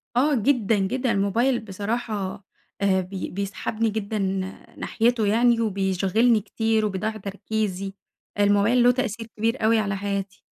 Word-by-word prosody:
آه 285 +3 +3
جدًا، 230 -2 +2
جدًا. 250 +6 0
الموبايل 230 +5 +2
بصراحة، 205 -1 -4 0.4
آآ، 190 -1 +3
بي 185 +1 -5
بيسحبني 200 +3 -2
جدًا 215 0 -3 0.6
ناحيته 230 -2 +1
يعني، 235 +2 +3
وبيشغلني 200 +2 +2
كتير 220 +1 0
وبيضيع 215 +2 -2
تركيزي. 200 -1 -3 0.5
الموبايل 205 +4 +4
له 245 - +7
تأثير 235 -3 -3
كبير 230 +2 0
أوي 225 0 +4
على 200 -2 -1
حياتي. 200 -1 -4
215 Hz, 125 wpm, -24 LUFS, 200-230 Hz, 0.6 s, له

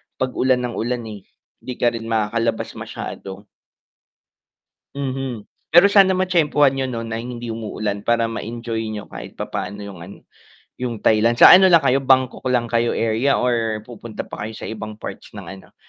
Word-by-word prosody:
pag 130 -1 -2
ulan 130 -1 +2
ng 120 - -4
ulan 120 +1 -2
eh 100 -2 -10 0.4
di 125 - -7
ka 120 -1 +2
rin 115 -1 -6
makakalabas 115 +1 -1
masyado. 95 +1 -7 1.5
Mhm, 130 -5 -4 0.2
pero 175 +4 +7
sana 195 -2 +5
matyempuhan 155 -7 +3
niyo 135 -1 -2
no'n 115 -2 -4
na 115 - -3
hindi 120 -1 -6
umuulan 105 -2 -4
para 115 +1 +1
ma-enjoy 115 0 -4
niyo 105 -1 -6
kahit - - -10
papaano 100 0 -5
'yong 95 -4 -10
ano, 95 +4 -10 0.6
'yong 120 -4 -4
Thailand, 110 +2 +3
sa - - +9
ano 190 +1 +9
lang 170 -4 +6
kayo, 135 0 +3
Bangkok 130 -1 +1
lang 120 -2 0
kayo 115 0 +1
area 115 +5 +1
or 115 -3 0
pupunta 115 -2 -8
pa 105 - -7
kayo 110 - -8
sa - - -7
ibang 110 -1 -6
parts 110 - -9
ng - - -7 0.2
ano - - -19
115 Hz, 170 wpm, -21 LUFS, 110-130 Hz, 1.5 s, sa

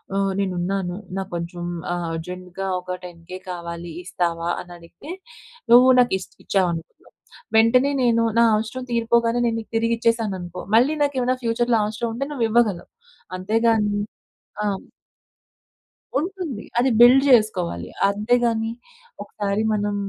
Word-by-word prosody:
ఆహ్, 195 -1 +1
నేను 195 -2 0
ఉన్నాను. 180 0 -2 0.2
నాకు 195 0 -4
కొంచెం 170 +1 -5 0.3
ఆహ్, 175 0 -2
అర్జెంట్‌గా 180 +3 -6
ఒక 180 0 -5
10,000 175 +1 -9
కావాలి 170 -1 -6
ఇస్తావా 170 -1 -2
అని 175 - -10
అడిగితే? 170 - -14 0.6
నువ్వు 250 +2 +8
నాకు 245 -4 +3
ఇస్త్ - - -11
ఇచ్చావు 190 -3 +1
అనుకున్నాం. 165 0 -10 0.4
వెంటనే 250 +5 +5
నేను, 230 -1 +3 0.2
నా - - +7
అవసరం 225 +4 -3
తీరిపోగానే 235 0 +2
నేను 230 -1 0
నీకు 220 - -11
తిరిగి 230 +1 +1
ఇచ్చేశాను 230 -4 +1
అనుకో 175 0 -7
మళ్ళీ 255 +7 +4
నాకు 285 -1 -1
ఏమైనా 255 +1 +1
ఫ్యూచర్‌లో 235 0 +1
అవసరం 220 +3 -3
ఉంటే 275 +4 -3
నువ్వు 255 -6 0
ఇవ్వగలవు. 215 -6 +1 0.5
అంతే 205 +5 -1
గాని 210 -2 +2 0.7
ఆ! - - -1 1.5
ఉంటుంది. 340 - -4 0.2
అది 255 +2 +3
బిల్డ్ 255 +3 +8
జేసుకోవాలి. 90 - +2 0.2
అంతేగాని 225 +2 +1 0.5
ఒకసారి 205 0 -2
మనం 205 0 -1
215 Hz, 135 wpm, -22 LUFS, 180-235 Hz, 1.5 s, నువ్వు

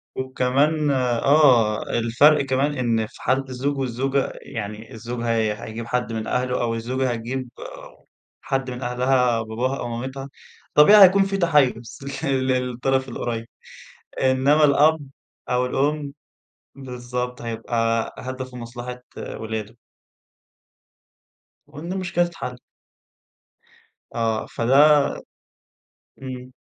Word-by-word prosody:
وكمان 140 +4 +1
آه. 125 -3 +3
الفرق 125 +6 +3
كمان 140 +2 0
إن 115 -3 0
في - - -17
حالة 130 +2 +1
الزوج 135 +3 -2
والزوجة، 135 +1 -1
يعني 105 0 -7
الزوج 120 +1 -6
هي 110 -2 +1
هيجيب 115 +1 -6
حد 120 -2 -2
من 110 -1 -4
أهله 125 0 -1
أو 115 -1 0
الزوجة 125 +3 -1
هتجيب 120 +2 -4 0.9
حد 135 -1 -2
من 125 +1 -7
أهلها 125 -1 +1
باباها 120 +5 -2
أو 120 - -4
مامتها، 130 +4 -5 0.4
طبيعي 200 +7 +8
هيكون 195 +1 +6
في 195 0 -2
تحيُّز 140 - +1 0.2
ل - - -1
للطرف 130 0 0
القريّب. 115 -1 -4 0.8
إنّما 135 +4 +4
الأب 150 +2 +4 0.5
أو 125 0 +1
الأم 140 +2 -1 0.6
بالضبط. 125 -2 -5
هيبقى 115 0 -1
هدفه 130 0 -6
مصلحة 120 +1 -8
ولاده. 110 0 -6 1.9
وإن 155 +5 -7
المشكلة 175 -2 0
تتحل. 165 -7 -7 1.6
آه. 115 -1 0
فده 140 +4 +4 1.2
إمم. 130 -1 -7
125 Hz, 105 wpm, -23 LUFS, 115-140 Hz, 1.9 s, طبيعي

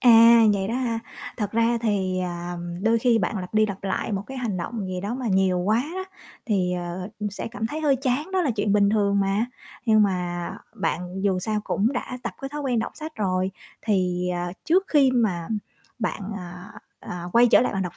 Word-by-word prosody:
À, 230 -1 +8
vậy 195 -1 -1
đó 230 - -1
hả? 240 -3 0 0.4
Thật 210 -3 -2
ra 230 +1 +2
thì, 190 -4 0
à, 175 0 -4 0.3
đôi 225 +1 +3
khi 235 -1 +3
bạn 200 +1 -1
lặp 180 +3 -7
đi 215 0 +5
lặp 195 -1 -6
lại 195 +2 -1
một 195 0 -1
cái 265 - -7
hành 220 -7 -2
động 210 +2 -4
gì 185 -1 -3
đó 205 +5 -3
mà 255 -2 -4
nhiều 190 -1 +3
quá 215 +6 +2
đó 375 0 -3 0.4
thì, 185 -5 +1
ờ, 180 +1 -4
ừm, 210 -1 -2
sẽ 205 - -5
cảm 220 -1 -3
thấy 310 +6 -4
hơi 285 -3 +3
chán, 275 +6 -1
đó 380 - +2
là 290 - +1
chuyện 205 -3 0
bình 200 -1 +4
thường 200 -2 +2
mà. 195 +4 +1 0.4
Nhưng 215 -1 +6
mà 180 -3 -1 0.2
bạn 185 -2 -2
dù 195 -2 +2
sao 210 +2 -1
cũng 225 +7 +1
đã 250 0 -4
tập - - -3
cái 270 - -4
thói 295 +1 -5
quen 250 -4 +1
đọc 225 - -2
sách 310 +1 -7
rồi, 185 -2 0 0.3
thì, 180 -4 +1
à, 175 0 -3
trước 370 +4 +3
khi 280 -4 +5
mà 200 -9 0 0.5
bạn, 220 -1 -2 0.2
à, 180 0 -9 0.3
à, 175 -1 -6
quay 240 +1 +7
trở - - +6
lại 250 - +1
bạn 195 -2 -1
đọc 180 - -5
210 Hz, 220 wpm, -25 LUFS, 185-235 Hz, 0.5 s, À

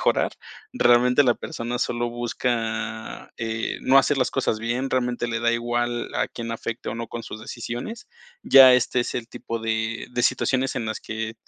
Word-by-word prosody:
mejorar, - - +2 0.4
realmente 125 - +4
la 125 -3 +3
persona 120 +2 -5
solo 120 -1 -1
busca, 115 -2 -3
eh, 115 0 -3
no 135 +1 +6
hacer 145 - +3
las 130 -1 +1
cosas 130 -5 0
bien, 120 +4 -2
realmente 125 -2 -1
le 115 0 -1
da 115 0 +2
igual 120 0 -2
a - - 0
quién 115 -1 -6
afecte 115 0 -5
o - - -3
no 115 -1 -5
con 120 - -6
sus 110 - -8
decisiones. 120 - -6 0.3
Ya 130 -1 +9
este 125 0 +2
es 120 - -3
el 115 -1 -4
tipo 115 -1 -5
de 110 0 -2
de 120 0 -1
situaciones 130 +1 +1
en 115 -3 -2
las 110 - -3
que, 110 0 -5
120 Hz, 185 wpm, -24 LUFS, 115-125 Hz, 0.4 s, Ya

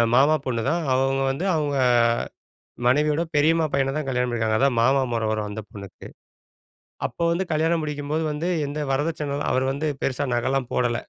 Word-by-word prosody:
மாமா 145 +4 +5
பொண்ணுதான், 130 +7 -1
அவங்க 135 +1 +1
வந்து 165 +8 -3
அவங்க 145 -2 -1 1.1
மனைவியோட 150 +5 +2
பெரியம்மா 160 +2 +3
பையன 135 0 +1
தான் 150 -3 -3
கல்யாணம் 125 -1 0
பண்ணிருக்காங்க. 110 -2 0
அதான் 135 -3 +2
மாமா 135 +3 +3
முறை 115 -1 -1
வரும் 110 -1 -2
அந்த 105 +1 -5
பொண்ணுக்கு. 100 -2 -10 1.0
அப்போ 170 - -5
வந்து 180 +3 0
கல்யாணம் 160 +1 +1
முடிக்கும்போது 150 +1 -2
வந்து 150 +4 -3 0.2
எந்த 145 +2 -4
வரதட்சண 145 0 -1
அவர் 130 +1 +1
வந்து 155 +3 -2 0.2
பெருசா 135 +2 -1
நக 120 +2 0
எல்லாம் 135 -3 -1
போடல. 120 -1 +1
140 Hz, 160 wpm, -24 LUFS, 125-150 Hz, 1.1 s, மாமா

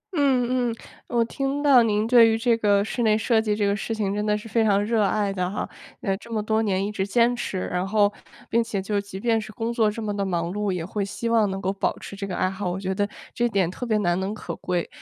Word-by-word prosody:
嗯 255 -3 +2
嗯， 230 - -3 0.3
我 235 -1 +1
听 275 +4 -2
到 275 -4 +7
您 215 -1 +1
对 230 -1 +7
于 225 - +1
这 230 0 +2
个 205 -2 +3
室 240 - -3
内 215 -2 +4
设 220 0 +2
计 215 -2 0
这 205 -1 0
个 200 - +2
事 225 +2 -3
情 200 -3 -1
真 210 +1 -1
的 210 0 +1
是 210 - -9
非 225 +1 +2
常 205 -2 +3
热 225 0 +1
爱 200 0 +1
的 180 -2 -1
哈， 200 - -3 0.3
呃， 195 -1 0
这 230 +3 -14
么 215 -2 -1
多 220 +1 +1
年 195 -3 0
一 205 - -3
直 195 -2 -2
坚 235 +3 +3
持， 195 -6 -3
然 180 +1 -1
后 205 0 +3 0.3
并 230 +1 +2
且 210 -3 -3
就 200 +1 -1
即 200 -1 -8
便 225 +1 +1
是 215 0 -9
工 230 0 -3
作 225 -2 +3
这 220 +1 -5
么 205 -1 -2
地 200 - -1
忙 170 -3 -1
碌， 210 -1 -1
也 175 -3 -3
会 200 +2 -2
希 230 +4 -4
望 225 -3 +3
能 195 0 -3
够 190 +1 -1
保 195 - -1
持 200 - -9
这 200 0 -5
个 185 - -4
爱 185 - +1
好， 190 -1 -3
我 180 +2 -3
觉 190 0 -2
得 205 +1 -1 0.2
这 240 0 +1
点 190 -5 +1
特 245 +6 -6
别 215 - +2
难 175 -3 +1
能 195 +3 -3
可 - - -6
贵。 175 -2 -2
210 Hz, 295 characters per minute, -24 LUFS, 195-230 Hz, 0.3 s, 到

